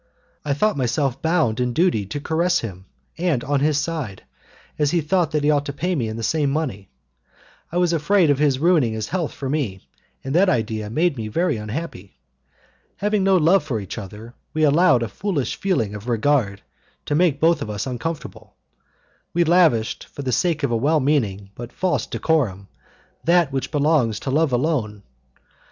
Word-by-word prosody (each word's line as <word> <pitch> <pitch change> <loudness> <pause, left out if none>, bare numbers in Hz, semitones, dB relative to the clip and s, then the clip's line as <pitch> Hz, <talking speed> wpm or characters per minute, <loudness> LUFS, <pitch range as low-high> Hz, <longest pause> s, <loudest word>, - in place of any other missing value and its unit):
I 145 -2 -1
thought 210 +6 +1
myself 135 +1 -1
bound 160 -9 +1
in 125 -1 0
duty 160 - +1
to 125 +9 -4
caress 165 +4 +1
him, 95 -4 -8 0.3
and 165 -8 0
on 145 0 0
his 150 +1 +2
side, 145 - -3 0.6
as 150 -1 +3
he 175 - +1
thought 165 +1 +1
that 150 -2 -1
he 150 - +4
ought 145 -1 0
to 140 - -4
pay 180 +6 -1
me 125 -9 -1
in 110 +1 -5
the 115 - -5
same 150 +2 +1
money, 130 -10 -3 0.8
I 175 - -2
was 175 -1 +2
afraid 165 +1 +3
of 140 - +1
his 145 -3 +3
ruining 155 -7 +3
his 110 -1 -4
health 175 -5 -2
for 135 - -6
me, 115 - -3 0.4
and 135 - -4
that 185 +4 +4
idea 110 -2 -1
made 160 +5 +1
me 110 -2 -4
very 170 +10 0
unhappy. 105 - -6 0.8
Having 205 0 0
no 195 -1 +4
love 175 +3 +4
for 130 -7 -2
each 100 +3 -6
other, 105 +4 -10 0.2
we 155 - +1
allowed 145 -4 +4
a - - -2
foolish 170 - -2
feeling 120 - -1
of 105 +3 -7
regard 115 -4 +1 0.4
to - - -2
make 155 -2 +2
both 165 -1 +3
of 110 - -4
us 105 -1 -3
uncomfortable. 145 +6 -6 0.8
We 175 - +4
lavished, 160 -10 +2
for 140 - -8
the 130 - -1
sake 160 +2 0
of 140 - +1
a - - +2
well 150 +7 +2
meaning 105 -9 0
but 120 +2 -8
false 175 - -1
decorum, 115 - -1 0.5
that 170 -3 +3
which 135 0 -2
belongs 145 -8 +1
to 135 - -3
love 155 +1 +2
alone. 120 -6 -1
145 Hz, 185 wpm, -22 LUFS, 115-165 Hz, 0.8 s, he